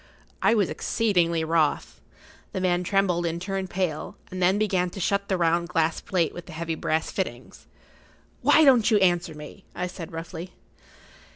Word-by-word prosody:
I 230 - +4
was 205 -5 +2
exceedingly 175 -7 +1
wroth. 155 - 0 0.5
The - - -2
man 180 -1 +1
trembled 185 -2 +1
and 165 +1 -3
turned 190 0 -3
pale,[Pg 175 -5 -3
38] - - -30
and 185 0 -5
then 185 +3 +4
began 190 -4 +1
to 195 - -9
shut 200 +2 0
the 190 - +1
round 170 0 +1
glass 165 -2 0
plate 175 -4 0
with 175 - -9
the 180 - -9
heavy 165 +1 -3
brass 160 0 -1
fittings. 130 -10 -5 0.7
"Why 315 - +5
don't 250 -5 +5
you 220 - +4
answer 175 -4 +2
me?" 150 +6 -11
I 180 - -2
said, 175 -2 -7
roughly. 165 +2 -7
175 Hz, 175 wpm, -25 LUFS, 165-190 Hz, 0.7 s, Why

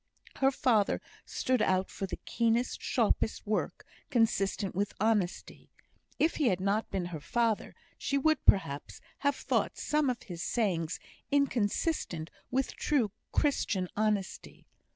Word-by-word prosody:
Her 270 - +4
father 230 -6 +2 0.3
stood 255 -3 0
out 185 -1 +1
for 195 - -4
the - - -5
keenest, 235 +1 0
sharpest 225 -2 +1
work, 215 0 -2 0.2
consistent 205 -4 +1
with 200 +2 -1
honesty; 210 -4 -1 0.5
if 320 - +2
he 295 - +2
had 185 -5 +2
not 200 +3 0
been 190 -2 -2
her 155 - -4
father 230 +6 0 0.2
she 280 - 0
would, 315 +2 +2
perhaps, 145 -7 +2 0.2
have 285 -1 +2
thought - - 0
some 300 -2 +1
of 245 -2 -3
his 175 -3 -7
sayings 180 -8 0 0.3
inconsistent 245 - 0 0.2
with 265 +1 0
true 255 -9 +1 0.2
Christian 205 -10 +1
honesty. 210 -2 -2
220 Hz, 130 wpm, -31 LUFS, 190-260 Hz, 0.5 s, Her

